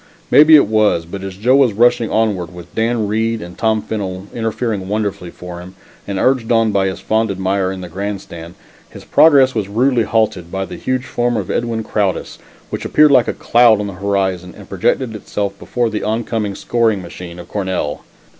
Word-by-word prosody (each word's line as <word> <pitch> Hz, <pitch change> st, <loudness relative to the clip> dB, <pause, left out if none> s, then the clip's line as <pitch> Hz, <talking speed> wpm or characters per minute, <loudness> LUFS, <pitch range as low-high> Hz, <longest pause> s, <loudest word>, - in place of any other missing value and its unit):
Maybe 155 Hz, +2 st, +8 dB
it 145 Hz, -, +6 dB
was, 105 Hz, -6 st, +2 dB
but 95 Hz, +3 st, -7 dB
as 95 Hz, -1 st, -7 dB
Joe 125 Hz, +6 st, +3 dB
was 135 Hz, -5 st, +4 dB
rushing 120 Hz, +1 st, +3 dB
onward, 100 Hz, -6 st, 0 dB
with 85 Hz, -1 st, -12 dB
Dan 115 Hz, -1 st, 0 dB
Reed 110 Hz, +2 st, -1 dB
and 90 Hz, -3 st, -9 dB
Tom 110 Hz, -1 st, 0 dB
Fennel 95 Hz, -3 st, -4 dB
interfering 115 Hz, -3 st, -2 dB
wonderfully 100 Hz, -3 st, -3 dB
for 90 Hz, 0 st, -9 dB
him, 90 Hz, +2 st, -11 dB, 0.3 s
and 100 Hz, -1 st, -3 dB
urged 125 Hz, 0 st, +1 dB
on 115 Hz, -1 st, +3 dB
by 95 Hz, -1 st, +1 dB
his 95 Hz, -, -4 dB
fond 110 Hz, 0 st, 0 dB
admirer 95 Hz, 0 st, -1 dB
in 95 Hz, -1 st, -6 dB
the 90 Hz, -, -7 dB
grandstand, 90 Hz, -2 st, -6 dB, 0.3 s
his -, -, -13 dB
progress 140 Hz, -5 st, +5 dB
was 105 Hz, -4 st, -2 dB
rudely 120 Hz, +3 st, +2 dB
halted 110 Hz, -7 st, 0 dB
by 95 Hz, 0 st, -3 dB
the -, -, -9 dB
huge 130 Hz, 0 st, -2 dB
form 120 Hz, -2 st, -1 dB
of 100 Hz, -4 st, -3 dB
Edwin 115 Hz, -2 st, -2 dB
Crowdis 100 Hz, -3 st, -2 dB, 0.3 s
which -, -, -4 dB
appeared 150 Hz, -1 st, +4 dB
like 125 Hz, -3 st, +5 dB
a -, -, -1 dB
cloud 120 Hz, -3 st, +4 dB
on 105 Hz, -, -2 dB
the 100 Hz, -, -6 dB
horizon 95 Hz, -2 st, -2 dB
and -, -, -12 dB
projected 120 Hz, -4 st, -1 dB
itself 100 Hz, -1 st, -3 dB
before 120 Hz, -2 st, -2 dB
the 105 Hz, -, -3 dB
oncoming 110 Hz, -2 st, -2 dB
scoring 110 Hz, -5 st, 0 dB
machine 85 Hz, 0 st, -9 dB
of 90 Hz, -, -10 dB
Cornell. 95 Hz, -7 st, -3 dB
105 Hz, 190 wpm, -17 LUFS, 95-115 Hz, 0.3 s, Maybe